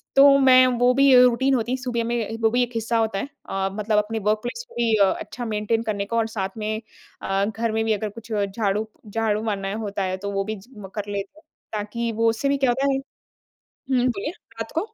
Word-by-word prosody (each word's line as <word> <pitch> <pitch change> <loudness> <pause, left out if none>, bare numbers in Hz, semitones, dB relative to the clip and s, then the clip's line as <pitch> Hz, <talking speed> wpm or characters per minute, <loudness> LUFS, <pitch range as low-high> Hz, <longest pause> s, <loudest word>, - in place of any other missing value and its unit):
तो 275 0 +8
मैं 255 -1 +7
वो 245 +1 +5
भी 275 0 +5
रूटीन 260 +2 +3
होती 240 +1 -1
है 260 - +1
सुबह 240 -3 -1
में 230 -2 -2
वो 225 - +4
भी 245 +2 +2
एक 245 - -4
हिस्सा 230 +1 0
होता 220 -3 0
है। 275 - -3 0.2
अ, 195 0 -1
मतलब 210 +1 0
अपने 220 +2 0
वर्क 215 0 +3
प्लेस 355 - -4
को - - -17
भी 235 -2 +1
अ, 200 -2 +5
अच्छा 245 -1 -6
मेंटेन 220 +1 -1
करने 205 -3 -2
का 230 +3 -2
और 225 -1 +2
साथ 195 -2 -4
में 215 +1 -2 0.4
अ, 195 +1 0
घर 220 +1 -2
में 225 0 0
भी 220 - +2
अगर 210 0 -2
कुछ 225 0 -15
झाड़ू 205 +1 -1 0.2
झाड़ू 215 0 0
मारना 195 -2 -2
होता 200 -1 -2
है 185 0 -2
तो 200 - -2
वो 195 0 0
भी 215 -1 -4
च 210 - -18 0.3
कर 205 -1 -4
लेते 200 +9 -5
हैं 320 - -27 0.3
ताकि 220 +3 -2
वो 225 +1 +2
उससे 225 +5 0
भी 280 - +2
क्या 270 -2 +2
होता 275 +3 +1
है - - +1 0.7
हुँ, 255 -2 -1
बोलिए 235 +3 -1 0.3
रात 225 - -4
को 325 - +2
225 Hz, 235 wpm, -23 LUFS, 210-245 Hz, 0.7 s, तो